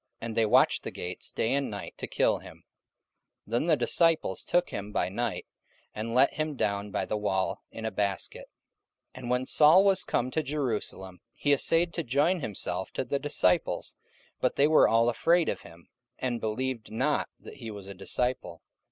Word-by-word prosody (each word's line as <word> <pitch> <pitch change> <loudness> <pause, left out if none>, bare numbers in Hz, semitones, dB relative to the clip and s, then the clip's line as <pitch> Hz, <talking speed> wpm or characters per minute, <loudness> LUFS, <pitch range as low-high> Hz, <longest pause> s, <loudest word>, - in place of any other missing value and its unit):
And 115 -1 -5
they 115 -1 +3
watched - - +4
the - - -5
gates 90 +1 -5
day 115 - 0
and 140 0 0
night 100 -1 -7
to - - -4
kill - - +1
him. - - -14 0.8
44:009:025 - - -16
Then 120 +6 +1
the 160 -3 +4
disciples 155 - +2
took 175 0 0
him 100 +1 -5
by 105 - 0
night, 115 +3 -3 0.5
and 115 +2 -4
let 130 +2 +5
him 155 -1 -2
down 100 -3 -1
by - - -2
the 105 - -2
wall 95 -1 -1
in 110 - -7
a 110 - -1
basket. 100 -2 -3 0.6
44:009:026 - - -10
And 120 - -6
when 125 +1 +1
Saul 155 +7 +6
was 195 -2 +3
come 125 +1 -1
to 160 - 0
Jerusalem, 115 -10 -3 0.2
he 145 - +2
assayed 165 +4 +2
to 170 - -2
join 150 +7 +1
himself 95 - -4
to - - -1
the 140 +2 -2
disciples: 140 -11 +1 0.5
but 125 - +1
they 140 - +4
were 155 - +6
all 115 +1 +3
afraid 165 +8 +3
of - - -2
him, 85 0 -15 0.3
and 120 -2 -2
believed 115 +1 -3
not 135 +7 0
that - - -12
he 115 -4 -7
was 100 -2 -8
a 100 - -7
disciple. 125 +7 -3
120 Hz, 190 wpm, -28 LUFS, 105-145 Hz, 0.8 s, Saul